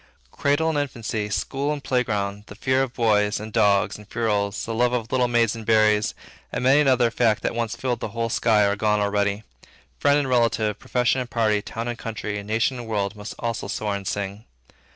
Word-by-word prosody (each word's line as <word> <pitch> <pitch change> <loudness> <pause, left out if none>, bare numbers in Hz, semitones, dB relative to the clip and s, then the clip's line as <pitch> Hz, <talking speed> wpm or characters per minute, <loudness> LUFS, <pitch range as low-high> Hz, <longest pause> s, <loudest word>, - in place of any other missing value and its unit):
Cradle 145 +3 +1
and 150 -2 0
infancy, 115 -6 -3
school 135 +7 -1
and 145 -2 -4
playground, 105 -5 -1
the 105 - -10
fear 130 +4 +1
of 135 -2 -1
boys, 105 -3 +2
and 110 0 -8
dogs, 105 -2 +2
and 105 - -15
ferules, 105 -4 -1
the 115 - -4
love 120 +2 +2
of 115 -2 -2
little 125 -1 +2
maids 115 -2 +2
and 115 - -7
berries, 110 0 +3 0.4
and - - -3
many 135 +3 +5
another 130 -4 +3
fact 115 -3 +1
that - - 0
once 115 -1 -2
filled 125 0 -2
the - - -3
whole 115 +2 -3
sky, 110 -2 +3
are 100 0 +1
gone 105 0 +1
already; 100 0 0 0.6
friend 145 0 +4
and 145 -2 0
relative 115 -4 +1
profession 125 +1 +1
and 125 - -6
party, 110 -3 +1
town 115 +3 -5
and 120 -1 -4
country, 105 -2 -4
nation 110 +5 0
and 120 - -7
world, 100 -2 -1
must 105 0 -8
also 115 -2 -3
soar 105 -2 -2
and 100 -1 -6
sing. 100 +1 -4
115 Hz, 205 wpm, -24 LUFS, 105-125 Hz, 0.6 s, many